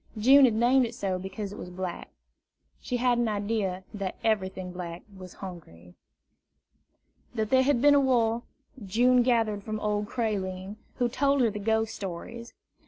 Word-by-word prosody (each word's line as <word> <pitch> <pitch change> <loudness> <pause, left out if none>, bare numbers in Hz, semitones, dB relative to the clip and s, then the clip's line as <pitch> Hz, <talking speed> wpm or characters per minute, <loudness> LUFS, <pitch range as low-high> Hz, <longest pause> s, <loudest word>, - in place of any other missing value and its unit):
June 265 +6 +7
had 235 -4 +2
named 250 +4 +4
it 235 -1 -4
so 190 -4 -2
because 195 +2 -6
it - - -9
was 180 - -7
black. 180 -1 -6 0.7
She 250 - -2
had 245 0 +2
an 240 - +1
idea 205 -3 -2
that 195 -3 -4
everything 190 -4 -1
black 175 -1 -7
was 185 -1 -11
hungry. 90 - -11 1.4
That 220 -2 -2
there 260 0 +5
had 260 -2 +2
been 290 0 +7
a 285 - +6
war, 240 -4 +2 0.4
June 245 +6 +3
gathered 225 -4 +1
from 215 0 -4
old 210 0 -1
Creline, 200 -4 -3 0.2
who 245 - +1
told 275 +3 +1
her 230 -3 +3
the 210 - -5
ghost 220 +1 0
stories. 205 +6 -7
215 Hz, 165 wpm, -27 LUFS, 190-240 Hz, 1.4 s, June